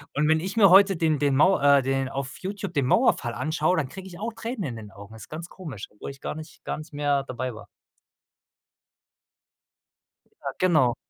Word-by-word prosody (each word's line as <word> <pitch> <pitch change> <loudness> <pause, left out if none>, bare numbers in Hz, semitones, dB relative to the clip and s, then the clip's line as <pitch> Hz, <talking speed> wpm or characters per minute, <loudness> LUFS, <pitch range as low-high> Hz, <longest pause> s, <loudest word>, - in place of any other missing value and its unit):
Und 150 +1 +2
wenn 160 0 +4
ich 190 +5 -5
mir 200 -4 +7
heute 195 0 +6
den 160 -3 +1
den 140 -1 +2
Mau 185 +5 +5
äh 140 0 +5
den 135 0 -1
auf 135 0 -5
YouTube 190 -2 -5
den 140 -4 +1
Mauerfall 120 -2 +2
anschaue, 155 +7 0
dann 145 -5 0
kriege 190 +3 -9
ich 175 - -11
auch 225 +2 -4
Tränen 225 0 -5
in 125 - -4
den 105 -2 -10
Augen, 100 +3 -12
ist 110 - -12
ganz 165 +2 -7
komisch, 145 - -8
obwohl 105 +6 -8
ich 135 - -14
gar - - -4
nicht 155 0 -11
gar - - -3
nicht 155 +1 -10
mehr 145 -1 +1
dabei 130 -2 -5
war. 105 -2 -11 2.7
Ja, - - -3
genau. 155 -10 +3
150 Hz, 200 wpm, -25 LUFS, 130-180 Hz, 2.7 s, mir